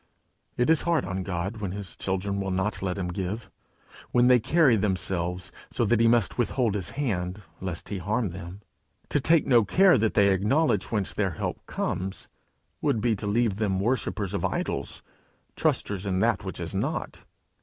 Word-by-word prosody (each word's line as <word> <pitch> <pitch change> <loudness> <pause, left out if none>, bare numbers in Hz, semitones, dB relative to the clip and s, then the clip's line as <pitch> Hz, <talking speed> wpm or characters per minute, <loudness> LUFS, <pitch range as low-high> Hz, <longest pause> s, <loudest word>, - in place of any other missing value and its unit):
It 125 +6 +3
is 160 - +5
hard 170 -2 +1
on 90 +1 -3
God, 95 +4 -3
when 100 -4 -4
his 100 -3 -6
children 100 +1 -2
will 95 - -2
not 95 +3 -1
let 95 -1 -2
him 90 -2 -2
give; 95 +5 -4 0.6
when 120 0 +4
they 125 0 +6
carry 135 +1 +4
themselves 90 -3 -1 0.2
so 120 - 0
that 115 +1 +3
he 115 - +5
must 115 -1 +2
withhold 120 -2 +1
his 95 -4 -2
hand, 100 -7 -2 0.2
lest 90 -3 -4
he 100 - -3
harm 105 +4 -1
them. 90 +3 -8 0.5
To 145 - +2
take 165 +3 +4
no 120 -4 +5
care 180 - +5
that 110 0 +1
they 100 -1 +5
acknowledge 105 - +1
whence 105 -4 -1
their 95 -4 0
help - - -3
comes, 95 +1 -3 0.5
would 110 - +1
be 115 +1 +1
to 105 - -4
leave 110 -1 +1
them 100 -3 0
worshippers 105 -3 -1
of 100 - -2
idols, - - -2 0.5
trusters 100 -1 0
in 95 -1 0
that 95 - +1
which - - -5
is - - -4
not. - - -3
100 Hz, 180 wpm, -27 LUFS, 95-120 Hz, 0.6 s, they